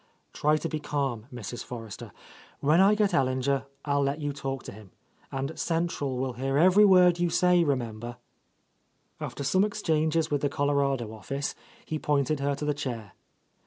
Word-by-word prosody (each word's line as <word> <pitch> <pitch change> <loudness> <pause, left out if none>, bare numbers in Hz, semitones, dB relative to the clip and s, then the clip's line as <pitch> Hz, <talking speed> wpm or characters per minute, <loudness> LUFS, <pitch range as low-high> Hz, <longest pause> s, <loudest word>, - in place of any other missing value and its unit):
"Try 150 +1 +2
to 165 - -3
be 155 -1 -3
calm, 135 -6 -2
Mrs. 120 -1 -6
Forrester. 115 -4 -8 0.5
When 155 +5 +4
I 200 +2 +6
get 205 -3 +1
Ellinger 135 -2 +1 0.2
I 145 - 0
will 145 - +3
let 140 +2 0
you 145 -1 -2
talk 135 -1 -4
to - - -8
him, 105 -1 -13 0.2
— - - -34
and 135 +4 -4
central 165 -6 -1
will 130 0 -2
hear 135 +3 -1
every 185 +6 +6
word 180 -3 +6
you 175 0 +2
say, 180 0 +4
remem 120 -7 -1
ber." 120 +1 -7 1.0
After 140 - -5
some 185 +8 +3
exchanges 160 -6 0
with 145 -1 +1
the 145 - +1
Colorado 140 -5 0
office, 135 +7 -4 0.3
he 155 - -3
pointed 145 0 +1
her 140 0 0
to 150 - -5
the 150 - +1
chair. 120 -8 -5
140 Hz, 180 wpm, -28 LUFS, 130-160 Hz, 1.0 s, I